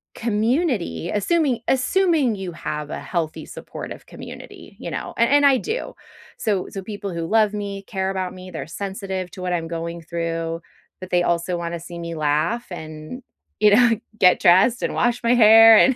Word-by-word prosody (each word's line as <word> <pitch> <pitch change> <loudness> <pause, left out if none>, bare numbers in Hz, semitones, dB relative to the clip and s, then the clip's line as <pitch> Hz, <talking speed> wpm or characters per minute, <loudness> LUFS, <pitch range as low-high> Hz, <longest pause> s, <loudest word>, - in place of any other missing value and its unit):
community 225 - 0
assuming 255 - +1
assuming 295 - +2
you 190 -2 -5
have 150 -2 -5
a - - -4
healthy 165 -4 -3
supportive - - -9
community, - - -11
you - - -6
know, - - -5
and 235 - +3
and 285 0 +5
I 275 -2 +6
do. 445 - -4 0.4
So 205 -5 -1
so, 195 - -6
people 200 -1 -6
who 165 -1 -3
love 215 0 +3
me, 200 -1 -5
care 190 -1 -3
about 185 -1 -3
me, 185 0 -10
they're - - -6
sensitive 190 0 -5
to 185 - -10
what 180 -1 -2
I'm 165 -1 -2
going 170 0 -5
through, 165 0 -3 0.4
but 185 0 -8
they 175 0 +3
also 175 +1 0
wanna 170 0 -4
see 170 +1 -9
me 170 -1 -5
laugh 155 +11 0
and, 155 +8 -8 0.4
you 210 -1 +5
know, 240 +1 +5 0.3
get 180 -1 +5
dressed 195 +8 +5
and - - -1
wash 240 0 0
my 235 +1 +4
hair 225 -1 +9
and, 265 +2 +5
190 Hz, 180 wpm, -22 LUFS, 170-230 Hz, 0.4 s, hair